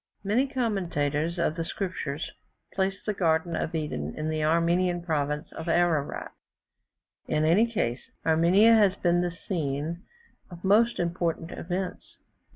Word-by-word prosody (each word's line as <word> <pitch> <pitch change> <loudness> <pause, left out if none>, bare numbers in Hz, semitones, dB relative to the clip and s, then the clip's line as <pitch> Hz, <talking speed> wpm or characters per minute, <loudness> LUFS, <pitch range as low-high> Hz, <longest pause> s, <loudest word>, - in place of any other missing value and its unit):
Many 225 +7 +2
commentators 170 - -1
of 165 -2 0
the 165 - -2
Scriptures 165 -5 -4 0.4
place 195 0 0
the 210 - 0
garden 165 -2 +1
of 165 +1 -2
Eden 80 - -3
in 155 +1 -2
the 155 -1 -1
Armenian 170 +2 +2
province 150 -2 -2
of 160 +1 -6
Ararat. 165 -4 +1 1.0
In 155 0 +1
any 210 +9 +4
case, 120 - -1 0.2
Armenia 175 +8 +5
has 205 -4 +5
been 175 -2 +2
the 175 -1 -3
scene 160 -1 -2 0.5
of 175 -1 -11
most 220 +5 +4
important 170 -1 -1
events. 180 +1 -5
170 Hz, 135 wpm, -27 LUFS, 155-190 Hz, 1.0 s, Armenia